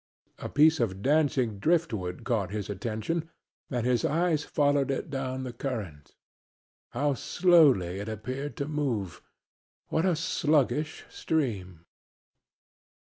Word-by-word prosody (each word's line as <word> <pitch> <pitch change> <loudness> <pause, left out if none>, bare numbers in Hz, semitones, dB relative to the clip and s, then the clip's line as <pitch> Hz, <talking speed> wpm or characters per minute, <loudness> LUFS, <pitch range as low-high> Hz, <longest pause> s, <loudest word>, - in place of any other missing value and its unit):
A - - -5
piece 155 +2 +4
of 100 -4 -1
dancing 135 -7 +2
driftwood 110 - 0
caught 110 -7 0
his 105 0 -4
attention 115 - -3 0.4
and 120 -4 -2
his 125 -2 +2
eyes 160 -1 +1
followed 145 -2 +1
it 140 +3 -3
down 130 -1 -3
the 125 -2 -5
current. 105 - -6 0.7
How 145 0 0
slowly 135 - +3
it 105 +2 -5
appeared 130 +7 -5
to 140 -2 -2
move! 130 - -2 0.7
What 160 +4 +1
a 180 - +2
sluggish 150 -4 0
stream! 95 - -2
130 Hz, 120 wpm, -28 LUFS, 105-150 Hz, 0.7 s, piece